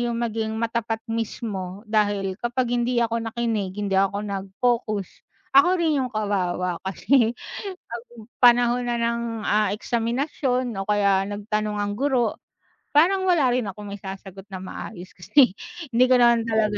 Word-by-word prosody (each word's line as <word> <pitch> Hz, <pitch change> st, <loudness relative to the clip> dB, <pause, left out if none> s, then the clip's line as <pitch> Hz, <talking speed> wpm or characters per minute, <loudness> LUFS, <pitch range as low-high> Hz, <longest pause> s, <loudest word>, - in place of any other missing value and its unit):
'yung 240 Hz, -1 st, -1 dB
maging 220 Hz, -1 st, -2 dB
matapat 230 Hz, -1 st, -1 dB
mismo 205 Hz, -4 st, -4 dB
dahil 205 Hz, -3 st, +1 dB
kapag 245 Hz, +1 st, -1 dB
hindi 240 Hz, 0 st, +1 dB
ako 230 Hz, 0 st, +1 dB, 0.2 s
nakinig, 225 Hz, -6 st, -1 dB
hindi 200 Hz, -2 st, -1 dB
ako 195 Hz, +1 st, +2 dB
nag-focus, 200 Hz, +1 st, -1 dB, 0.5 s
ako 280 Hz, +6 st, +8 dB
rin 310 Hz, -4 st, +2 dB
'yung 250 Hz, -, -3 dB
kawawa 185 Hz, -4 st, -1 dB
kasi, 225 Hz, +5 st, +2 dB, 0.6 s
'pag 235 Hz, 0 st, -6 dB, 0.4 s
panahon 245 Hz, 0 st, +5 dB
na 240 Hz, -, 0 dB
ng, 235 Hz, 0 st, 0 dB, 0.2 s
ah, 210 Hz, -1 st, +2 dB
eksaminasyon 250 Hz, +3 st, -1 dB
o 195 Hz, -, -4 dB
kaya 200 Hz, -2 st, +3 dB
nagtanong 210 Hz, +1 st, -2 dB
ang 205 Hz, 0 st, -1 dB
guro, 260 Hz, -5 st, +1 dB, 0.6 s
parang 375 Hz, +5 st, +4 dB
wala 305 Hz, -8 st, +4 dB
rin 245 Hz, -4 st, 0 dB
akong 205 Hz, +1 st, -8 dB
maisasagot 195 Hz, -1 st, -9 dB
na 190 Hz, -, -5 dB
maayos 185 Hz, -1 st, -8 dB
kasi 210 Hz, -, +4 dB, 0.4 s
hindi 250 Hz, +2 st, +5 dB
ko 255 Hz, -, +6 dB
naman 235 Hz, -1 st, +5 dB
talaga 215 Hz, -2 st, +1 dB
225 Hz, 145 wpm, -24 LUFS, 200-240 Hz, 0.6 s, ako